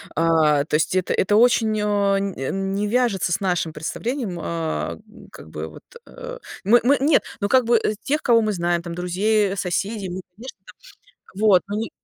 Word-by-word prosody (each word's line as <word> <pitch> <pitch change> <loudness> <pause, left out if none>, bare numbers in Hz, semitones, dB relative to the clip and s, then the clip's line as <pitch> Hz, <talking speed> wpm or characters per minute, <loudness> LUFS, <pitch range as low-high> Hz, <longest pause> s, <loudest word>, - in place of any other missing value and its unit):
А, 155 -3 +3
то 150 - -1
есть 160 +4 +1
это 185 - 0
это 205 +2 +2
очень 225 -2 +3
а 200 -1 +1
нь 195 -1 -3
э 135 - -3
не 195 +2 -2
вяжется 225 -7 +1
с 195 - +1
нашим 180 -4 -1
представлением, 215 - -4
а, 120 - -3
м, - - -16
как - - -13
бы 80 0 -6
вот, - - -14 0.2
э - - -18
э - - -8 0.3
Мы 235 +4 +5
мы 280 +3 +4
нет, 285 +2 +3 0.2
ну, 200 - 0
как 260 -1 +4
бы 235 0 +4
э 215 -1 -1
тех, 300 +2 0
кого 235 -2 +4
мы 215 -1 0
знаем, 175 -2 0
там 170 0 -7
друзей, 195 +4 0
э, - - -4
соседей, 195 +2 -2
мы, 180 +2 -5
конечно, 235 +1 -10
там. - - -14 0.7
Вот 205 -4 +5
мы 205 - -3
ни 225 +1 -3
195 Hz, 210 wpm, -22 LUFS, 170-225 Hz, 0.7 s, Мы